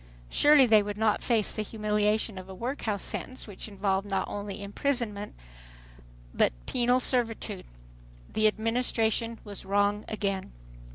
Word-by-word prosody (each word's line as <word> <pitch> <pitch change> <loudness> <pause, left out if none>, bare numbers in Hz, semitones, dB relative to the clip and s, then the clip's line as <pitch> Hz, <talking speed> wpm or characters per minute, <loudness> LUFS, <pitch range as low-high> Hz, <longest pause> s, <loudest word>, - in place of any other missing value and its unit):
Surely 290 -2 +6
they 220 -3 +6
would 205 0 -4
not 215 -1 +2
face 225 -4 +2
the 215 - -2
humiliation 210 -1 0
of 185 +1 -11
a 190 - -8
workhouse 230 -2 -2
sentence 255 - -4
which 205 -1 -8
involved 195 -1 -1
not 195 -1 -1
only 205 -1 -5
imprisonment 210 -1 -2 1.0
but - - +3
penal 245 +1 +2
servitude! 225 -6 -1 0.7
The 215 - +4
Administration 225 0 +1
was 205 -2 -7
wrong 205 +1 +1
again. 200 - -3
210 Hz, 130 wpm, -28 LUFS, 200-230 Hz, 1.0 s, Surely